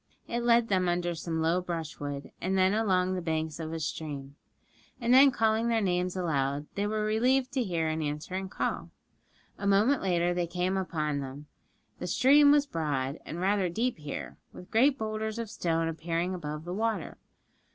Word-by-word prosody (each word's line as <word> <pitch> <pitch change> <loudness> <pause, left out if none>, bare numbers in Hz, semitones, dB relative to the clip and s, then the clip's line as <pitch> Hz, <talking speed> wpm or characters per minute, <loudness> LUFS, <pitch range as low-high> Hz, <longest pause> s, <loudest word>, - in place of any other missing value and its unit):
It 235 - -2
led 235 -1 +4
them 185 -3 +2
under 175 0 0
some 160 0 -3
low 170 +3 +2
brushwood, 155 -5 -5
and 190 +2 0
then 190 +1 +4
along 185 -4 +2
the 185 - -2
banks 160 -1 -2
of 160 -1 -4
a 165 - -3
stream. 145 -3 -5 0.6
And 240 0 +2
then 270 +2 +8
calling 225 -2 +1
their 230 -1 +2
names 180 -2 0
aloud, 145 -5 -1
they 205 0 -1
were 215 0 -1
relieved 250 +5 +2
to 260 -2 0
hear 170 -6 -1
an 155 0 -1
answering 160 +6 -3
call. - - -3 0.7
A 200 - -2
moment 210 +8 +4
later 175 -2 +1
and 175 - -1
they 175 - 0
came 180 +2 -1
upon 155 -6 -1
them. 140 +2 -7 0.5
The - - -4
stream 285 +3 +6
was 290 -1 +4
broad, 145 - -2
and 165 - -5
rather 190 0 +1
deep 230 +4 -1
here, 150 -2 -6
with 180 - -12
great 265 +5 +4
boulders 220 0 -3
of 230 -2 -4
stone 165 -1 0
appearing 165 +2 -2
above 150 -3 -5
the 175 - -4
water. 215 -3 -2
180 Hz, 185 wpm, -29 LUFS, 160-220 Hz, 0.7 s, then